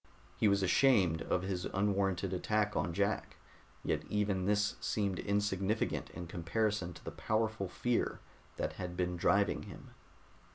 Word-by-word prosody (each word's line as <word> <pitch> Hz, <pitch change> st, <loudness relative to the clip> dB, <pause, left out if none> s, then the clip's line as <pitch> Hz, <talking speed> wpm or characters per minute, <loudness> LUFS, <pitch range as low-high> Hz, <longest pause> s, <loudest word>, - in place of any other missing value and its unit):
He -, -, +3 dB
was 100 Hz, -1 st, +3 dB
ashamed 95 Hz, -5 st, +4 dB
of 90 Hz, -, 0 dB
his 95 Hz, -2 st, -2 dB
unwarranted 95 Hz, -2 st, 0 dB
attack 105 Hz, +3 st, 0 dB
on 85 Hz, -, 0 dB
Jack, 100 Hz, +4 st, -1 dB, 0.5 s
yet 75 Hz, -, 0 dB
even 100 Hz, -3 st, 0 dB
this 105 Hz, +1 st, +2 dB
seemed 100 Hz, -4 st, 0 dB
insignificant 100 Hz, +1 st, 0 dB
in 85 Hz, -, -7 dB
comparison 90 Hz, +3 st, -1 dB
to -, -, -14 dB
the -, -, -4 dB
powerful 110 Hz, -3 st, -1 dB
fear 120 Hz, +4 st, 0 dB, 0.4 s
that -, -, -2 dB
had 90 Hz, -1 st, -5 dB
been 90 Hz, 0 st, 0 dB
driving 100 Hz, +3 st, +2 dB
him. -, -, -11 dB
100 Hz, 140 wpm, -34 LUFS, 90-105 Hz, 0.5 s, ashamed